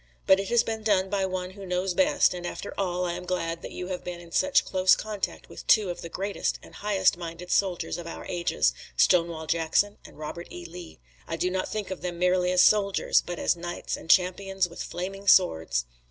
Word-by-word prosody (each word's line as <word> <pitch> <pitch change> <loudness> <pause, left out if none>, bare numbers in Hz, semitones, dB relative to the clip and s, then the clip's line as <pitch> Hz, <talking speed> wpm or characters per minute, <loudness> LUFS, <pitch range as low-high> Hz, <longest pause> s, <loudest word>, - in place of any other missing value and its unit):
But 190 - +6
it 195 - -3
has 240 -1 +4
been 220 -1 -3
done 195 -3 +1
by 195 -2 +1
One 185 -1 -4
who 200 +1 -11
knows 180 0 -1
best, 285 +2 +3
and 175 -1 -6
after 175 +3 -5
all 180 -2 -1
I 175 - -1
am 180 - -6
glad 170 -2 -2
that - - -7
you 180 +1 -6
have 180 -1 -4
been 175 -1 -6
in 170 -1 -13
such 285 +9 +3
close 185 0 +4
contact 210 -2 -4
with - - -11
two 210 -6 +4
of 175 - -7
the 170 - -7
greatest 195 +4 -2
and - - -14
highest 195 -4 +1
minded 170 +1 -7
soldiers 185 -3 0
of 170 - -7
the 170 - -7
ages, 75 - +1 0.2
Stonewall 165 - +3
Jackson 165 +6 +1
and - - -14
Robert 155 +3 -6
E. 175 0 -8
Lee. 170 0 -10 0.3
I - - -3
do 180 - -1
not 185 0 -2
think 210 -3 -4
of 190 - -5
them 175 -1 -4
merely 180 0 +2
as 180 0 +5
soldiers, 200 -2 +3
but 175 - -5
as - - +1
knights 175 0 -4
and - - -12
champions 190 +1 +3
with 170 - -9
flaming 195 +3 -6
swords. 80 - +4
180 Hz, 220 wpm, -27 LUFS, 175-195 Hz, 0.3 s, But